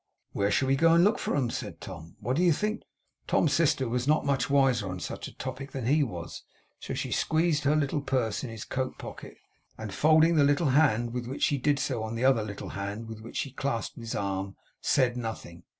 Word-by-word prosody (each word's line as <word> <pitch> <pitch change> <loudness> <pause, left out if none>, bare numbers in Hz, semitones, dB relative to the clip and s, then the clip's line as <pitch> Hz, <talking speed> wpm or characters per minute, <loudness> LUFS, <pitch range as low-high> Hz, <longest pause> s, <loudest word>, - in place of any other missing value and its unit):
'Where 100 0 0
shall 130 +6 +2
we 135 - +3
go 165 +4 +4
and 170 - +6
look 210 +3 +3
for - - -1
'em?' 125 -5 0
said 105 -9 -5
Tom. 85 -2 -9
'What 120 +4 -1
do 165 - +1
you 180 -1 +5
think?' 210 +8 -1 0.5
Tom's 150 -4 +2
sister 145 -4 +2
was 125 +2 -1
not 155 +1 +3
much 140 -1 +1
wiser 130 -7 +3
on 95 0 -5
such - - -5
a - - -14
topic 130 +1 -6
than 130 -4 -4
he 145 +5 +3
was. 90 -11 -4 0.4
So - - -5
she - - -3
squeezed 160 -2 +1
her 145 +2 +4
little 145 -1 0
purse 130 -6 -1
into 120 -3 -5
his 110 - -7
coat 130 -1 -3
pocket, - - -9 0.4
and 110 -3 -6
folding 160 +2 +4
the 145 - +6
little 145 +2 +3
hand 120 -5 +3
with 125 -1 -3
which 135 - -4
she 145 - +2
did 145 +2 +2
so 130 -4 -1
on 110 +1 -4
the 120 +3 0
other 130 -4 +4
little 100 -2 -6
hand 100 +3 -5
with 110 -1 -8
which 115 - -8
she 140 - -2
clasped 135 -3 -3
his 115 -1 -5
arm, 95 -1 -3 0.3
said 130 -4 +2
nothing. 110 -7 -6
130 Hz, 230 wpm, -28 LUFS, 110-145 Hz, 0.5 s, and